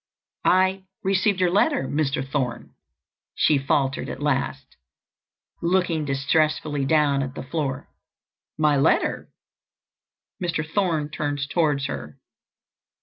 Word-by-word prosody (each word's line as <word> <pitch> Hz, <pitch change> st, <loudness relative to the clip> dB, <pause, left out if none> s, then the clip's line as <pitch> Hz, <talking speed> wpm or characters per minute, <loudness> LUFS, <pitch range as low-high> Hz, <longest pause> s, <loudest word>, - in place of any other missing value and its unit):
"I—received 190 Hz, +1 st, +1 dB
your 180 Hz, -1 st, +3 dB
letter, 280 Hz, -, +2 dB
Mr. 135 Hz, -3 st, -1 dB
Thorne," 130 Hz, -4 st, -3 dB, 0.6 s
she 150 Hz, -3 st, +3 dB
faltered 135 Hz, 0 st, 0 dB
at -, -, -6 dB
last, 135 Hz, -2 st, -2 dB, 0.9 s
looking 170 Hz, -3 st, +1 dB
distressfully 145 Hz, +1 st, +1 dB
down 145 Hz, -1 st, +3 dB
at 135 Hz, 0 st, -4 dB
the -, -, -5 dB
floor. 140 Hz, -1 st, -3 dB, 0.7 s
"My 150 Hz, -2 st, +3 dB
letter!" 140 Hz, -, +1 dB, 1.1 s
Mr. 165 Hz, -3 st, -1 dB
Thorne 165 Hz, -4 st, 0 dB
turned 145 Hz, -2 st, -2 dB
towards 145 Hz, -4 st, +1 dB
her. 75 Hz, -, -6 dB
150 Hz, 100 wpm, -24 LUFS, 140-175 Hz, 1.1 s, your